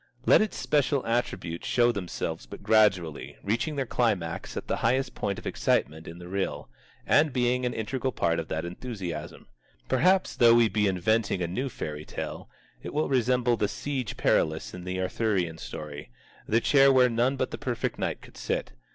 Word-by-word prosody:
Let -, -, +6 dB
its 215 Hz, -, -1 dB
special 145 Hz, -2 st, +1 dB
attributes 115 Hz, -8 st, -2 dB
show 120 Hz, -1 st, +4 dB
themselves 90 Hz, -, -4 dB
but -, -, -10 dB
gradually, 95 Hz, -8 st, +2 dB
reaching 115 Hz, +9 st, -1 dB
their 135 Hz, -2 st, -1 dB
climax 100 Hz, -9 st, -1 dB
at -, -, -5 dB
the -, -, 0 dB
highest 130 Hz, +1 st, +1 dB
point 100 Hz, -1 st, -2 dB
of -, -, -10 dB
excitement 80 Hz, +2 st, 0 dB
in 85 Hz, -, -8 dB
the 90 Hz, 0 st, -10 dB
reel, 95 Hz, -8 st, -3 dB, 0.3 s
and 150 Hz, 0 st, +4 dB
being 125 Hz, 0 st, +1 dB
an 120 Hz, -, -3 dB
integral 130 Hz, +4 st, -2 dB
part 85 Hz, -7 st, 0 dB
of 80 Hz, -, -4 dB
that 80 Hz, +2 st, -3 dB
enthusiasm. 90 Hz, -4 st, -6 dB, 0.4 s
Perhaps, 185 Hz, +8 st, +2 dB
though 115 Hz, -1 st, +7 dB
we 120 Hz, -2 st, +5 dB
be 105 Hz, 0 st, +1 dB
inventing 95 Hz, +1 st, +1 dB
a -, -, -1 dB
new 125 Hz, +11 st, -2 dB
fairy 75 Hz, -9 st, -5 dB
tale, -, -, -6 dB, 0.3 s
it -, -, -7 dB
will 155 Hz, -1 st, +1 dB
resemble 125 Hz, -2 st, +2 dB
the 105 Hz, -, +1 dB
Siege 130 Hz, +2 st, -4 dB
Perilous 80 Hz, 0 st, +1 dB
in 90 Hz, 0 st, -8 dB
the 95 Hz, 0 st, -3 dB
Arthurian 95 Hz, -4 st, -1 dB
story, 75 Hz, -4 st, -7 dB, 0.4 s
the 115 Hz, +2 st, +2 dB
chair 135 Hz, +1 st, +5 dB
where 130 Hz, -1 st, +6 dB
none 120 Hz, +3 st, +1 dB
but 130 Hz, -1 st, -2 dB
the -, -, -6 dB
perfect 125 Hz, -5 st, -2 dB
knight -, -, -2 dB
could -, -, -15 dB
sit. -, -, -2 dB
110 Hz, 180 wpm, -27 LUFS, 90-125 Hz, 0.4 s, though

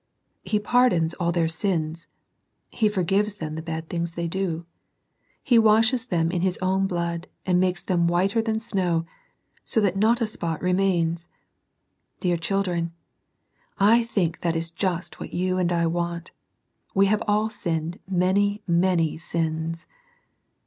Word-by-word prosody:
He 210 Hz, -, 0 dB
pardons 210 Hz, -7 st, +3 dB
all 170 Hz, -1 st, +1 dB
their 170 Hz, -1 st, +1 dB
sins. 165 Hz, -2 st, -2 dB, 0.6 s
He 215 Hz, -2 st, +2 dB
forgives 200 Hz, +1 st, +1 dB
all 155 Hz, -1 st, -4 dB
the 160 Hz, +1 st, -4 dB
bad 160 Hz, -1 st, -5 dB
things 170 Hz, 0 st, -3 dB
they 170 Hz, 0 st, -2 dB
do. 170 Hz, -2 st, -2 dB, 0.8 s
He 245 Hz, -5 st, +5 dB
washes 225 Hz, +3 st, +4 dB
them 165 Hz, -4 st, +1 dB
in 175 Hz, -1 st, -1 dB
His 185 Hz, 0 st, +1 dB
own 190 Hz, +1 st, +1 dB
blood, 170 Hz, -1 st, -3 dB, 0.2 s
and 180 Hz, -1 st, +3 dB
makes 180 Hz, -1 st, 0 dB
them 175 Hz, -5 st, +1 dB
whiter 190 Hz, +6 st, +2 dB
than 220 Hz, -1 st, -1 dB
snow, 180 Hz, -7 st, 0 dB, 0.6 s
so -, -, 0 dB
that 195 Hz, -3 st, +1 dB
not 220 Hz, +4 st, +3 dB
a 230 Hz, -, +1 dB
spot 170 Hz, -7 st, -3 dB
remains. 180 Hz, -3 st, +1 dB, 0.9 s
Dear 175 Hz, -2 st, +1 dB
children, 175 Hz, -2 st, -1 dB, 0.8 s
I 220 Hz, +4 st, +5 dB
think 190 Hz, -8 st, -1 dB
that 170 Hz, -1 st, 0 dB
is 165 Hz, 0 st, -3 dB
just 175 Hz, 0 st, -3 dB
what -, -, -7 dB
you 185 Hz, +1 st, 0 dB
and 175 Hz, -1 st, +1 dB
I 170 Hz, -1 st, +2 dB
want 170 Hz, +1 st, -2 dB, 0.6 s
We 195 Hz, +1 st, +5 dB
have 210 Hz, +1 st, +2 dB
all 210 Hz, +1 st, +2 dB
sinned 165 Hz, -4 st, -3 dB
many 200 Hz, +3 st, +1 dB
many 170 Hz, -3 st, +2 dB
sins. 165 Hz, 0 st, -3 dB
180 Hz, 150 wpm, -25 LUFS, 170-200 Hz, 0.9 s, He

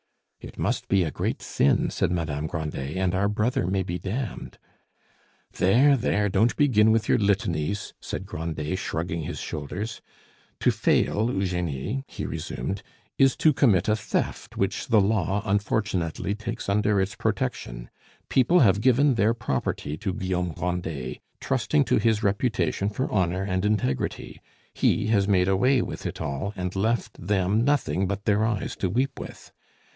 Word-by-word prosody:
"It -, -, -11 dB
must -, -, -1 dB
be 95 Hz, -2 st, +3 dB
a 80 Hz, -, -2 dB
great -, -, -3 dB
sin," 70 Hz, -, +2 dB
said -, -, 0 dB
Madame 80 Hz, -4 st, -2 dB
Grandet, 75 Hz, -1 st, -4 dB
"and 95 Hz, -1 st, +1 dB
our 100 Hz, +2 st, +2 dB
brother 105 Hz, 0 st, 0 dB
may 95 Hz, +1 st, 0 dB
be 90 Hz, 0 st, -4 dB
damned." 110 Hz, +2 st, -5 dB, 1.0 s
"There, 130 Hz, +10 st, +4 dB
there, 105 Hz, -4 st, +1 dB
don't 110 Hz, +5 st, +2 dB
begin 110 Hz, -7 st, +4 dB
with 110 Hz, 0 st, +1 dB
your -, -, +3 dB
litanies!" 100 Hz, -3 st, 0 dB
said 95 Hz, -, -5 dB
Grandet, 80 Hz, -2 st, -4 dB
shrugging 80 Hz, -1 st, -3 dB
his 75 Hz, -, -5 dB
shoulders. 90 Hz, +10 st, -5 dB, 0.6 s
"To -, -, +4 dB
fail, 110 Hz, +4 st, +1 dB
Eugenie," 90 Hz, -, -2 dB
he -, -, -6 dB
resumed, 95 Hz, +1 st, -4 dB, 0.4 s
"is 135 Hz, -1 st, +5 dB
to 155 Hz, -, +4 dB
commit 105 Hz, -9 st, +3 dB
a 105 Hz, -, +3 dB
theft 105 Hz, -, -3 dB
which -, -, -1 dB
the 110 Hz, -, +5 dB
law, 100 Hz, 0 st, +1 dB
unfortunately, 100 Hz, -3 st, -1 dB
takes 115 Hz, +2 st, -5 dB
under 105 Hz, 0 st, +2 dB
its 95 Hz, +1 st, 0 dB
protection. -, -, -3 dB, 0.4 s
People 155 Hz, +7 st, +4 dB
have 100 Hz, -4 st, +4 dB
given 130 Hz, +3 st, +4 dB
their 115 Hz, 0 st, +2 dB
property 75 Hz, -, -2 dB
to 95 Hz, +4 st, -2 dB
Guillaume 90 Hz, -4 st, -2 dB
Grandet 85 Hz, -7 st, -3 dB, 0.2 s
trusting 135 Hz, +3 st, +1 dB
to 125 Hz, -, +2 dB
his 110 Hz, 0 st, +1 dB
reputation 100 Hz, -1 st, 0 dB
for 115 Hz, +6 st, -2 dB
honor 95 Hz, -1 st, +1 dB
and 95 Hz, -1 st, -1 dB
integrity; 105 Hz, -11 st, -1 dB, 0.3 s
he -, -, +2 dB
has 100 Hz, -3 st, +2 dB
made 95 Hz, -3 st, +3 dB
away 120 Hz, +7 st, +3 dB
with -, -, -5 dB
it -, -, -6 dB
all, 70 Hz, +9 st, -3 dB
and 90 Hz, 0 st, -4 dB
left 110 Hz, -2 st, -1 dB
them 100 Hz, +2 st, +2 dB
nothing 130 Hz, -9 st, +1 dB
but 100 Hz, +1 st, -4 dB
their 105 Hz, 0 st, +3 dB
eyes 110 Hz, -3 st, -1 dB
to 95 Hz, -, -1 dB
weep 130 Hz, +7 st, -1 dB
with. -, -, -10 dB
100 Hz, 155 wpm, -25 LUFS, 90-110 Hz, 1.0 s, is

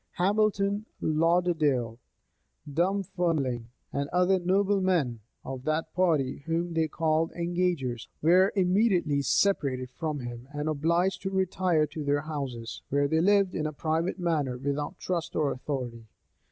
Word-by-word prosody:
[*] -, -, -49 dB
Hamilton, 205 Hz, +2 st, +1 dB
Lauderdale, 155 Hz, -7 st, +1 dB, 0.7 s
Dumfermling, 165 Hz, -7 st, 0 dB, 0.3 s
and 140 Hz, 0 st, -2 dB
other 180 Hz, +2 st, +3 dB
noblemen 185 Hz, -, +1 dB, 0.3 s
of 130 Hz, -1 st, -6 dB
that 160 Hz, +1 st, -1 dB
party 160 Hz, -8 st, +1 dB
whom 170 Hz, +1 st, -1 dB
they 160 Hz, -1 st, +1 dB
called 160 Hz, +1 st, 0 dB
engagers, 170 Hz, -8 st, -1 dB
were 180 Hz, +5 st, +5 dB
immediately 180 Hz, -6 st, +2 dB
separated 135 Hz, -7 st, +1 dB
from 150 Hz, 0 st, -3 dB
him, 120 Hz, 0 st, -7 dB
and 145 Hz, +1 st, -3 dB
obliged 170 Hz, +5 st, +1 dB
to 190 Hz, -, -2 dB
retire 185 Hz, -4 st, +1 dB
to 150 Hz, +1 st, -6 dB
their 145 Hz, 0 st, +1 dB
houses, 135 Hz, -7 st, -5 dB
where 140 Hz, +1 st, +2 dB
they 160 Hz, +2 st, +2 dB
lived 200 Hz, 0 st, +3 dB
in 155 Hz, -, -1 dB
a -, -, -3 dB
private 160 Hz, +5 st, -1 dB
manner, 155 Hz, -8 st, 0 dB
without 140 Hz, +2 st, -3 dB
trust 170 Hz, -3 st, -3 dB
or 150 Hz, -3 st, +1 dB
authority. 125 Hz, -4 st, -5 dB
160 Hz, 135 wpm, -28 LUFS, 140-180 Hz, 0.7 s, were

